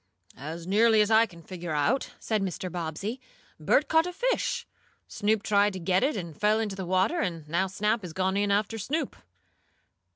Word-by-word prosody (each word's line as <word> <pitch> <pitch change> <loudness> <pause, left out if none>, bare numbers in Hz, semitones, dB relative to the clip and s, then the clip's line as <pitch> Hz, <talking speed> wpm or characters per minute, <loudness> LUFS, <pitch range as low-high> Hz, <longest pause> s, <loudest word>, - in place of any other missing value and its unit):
"As 160 +5 -7
nearly 220 +4 +4
as 210 +1 +1
I 225 +1 +6
can 170 -4 -15
figure 175 -3 -6
out," 215 - +1
said 215 -2 -1
Mr. 185 -1 -3
Bobbsey, 175 - -4 0.4
"Bert 270 - +3
caught 320 +2 +3
a 360 - -5
fish, - - -1 0.4
Snoop 210 0 0
tried 205 0 +3
to 190 - -5
get 185 +2 +1
it 270 -3 +1
and 170 -5 -6
fell 210 +5 +2
into 210 -3 -2
the 190 -2 -5
water, 190 - +2
and 165 - -3
now 175 +5 +1
Snap 210 +4 0
has 180 -3 -7
gone 190 +3 0
in 205 0 +1
after 205 +2 0
Snoop." 280 +7 -2
200 Hz, 190 wpm, -27 LUFS, 180-220 Hz, 0.4 s, I